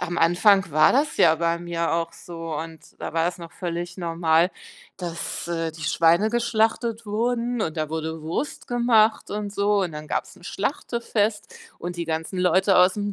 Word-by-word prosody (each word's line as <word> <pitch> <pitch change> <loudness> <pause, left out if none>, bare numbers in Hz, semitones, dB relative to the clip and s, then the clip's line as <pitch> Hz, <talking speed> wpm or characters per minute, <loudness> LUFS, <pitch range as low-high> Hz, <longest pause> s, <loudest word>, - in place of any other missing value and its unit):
am 175 0 -2
Anfang 180 +2 +4
war 155 +1 +5
das 285 +4 +1
ja 160 -2 +5
bei 170 +1 0
mir 170 -1 -2
auch 165 0 -1
so 165 -2 -7
und 160 +1 -6 0.2
da - - -5
war 165 +1 +2
es 180 +1 -3
noch 170 -1 -9
völlig 175 -1 -5
normal, 165 0 +2 0.5
dass, 170 -1 -5
äh, 165 -2 -2
die 160 - -10
Schweine 170 +7 +3
geschlachtet 230 -1 0
wurden 235 +2 -1
und 160 0 -3
da 155 -1 -1
wurde 160 0 -4
Wurst 165 - -4
gemacht 235 -3 +3
und 205 -1 -4
so 205 0 +2
und 175 -4 -3
dann 150 0 -7
gab - - -1
es - - -16
'n 175 - -17
Schlachtefest 215 -1 -2 0.3
und 175 +1 -5
die 170 - -3
ganzen 160 +3 -3
Leute 185 +2 +3
aus 180 +1 +6
dem 205 -1 -3
175 Hz, 185 wpm, -24 LUFS, 165-210 Hz, 0.5 s, aus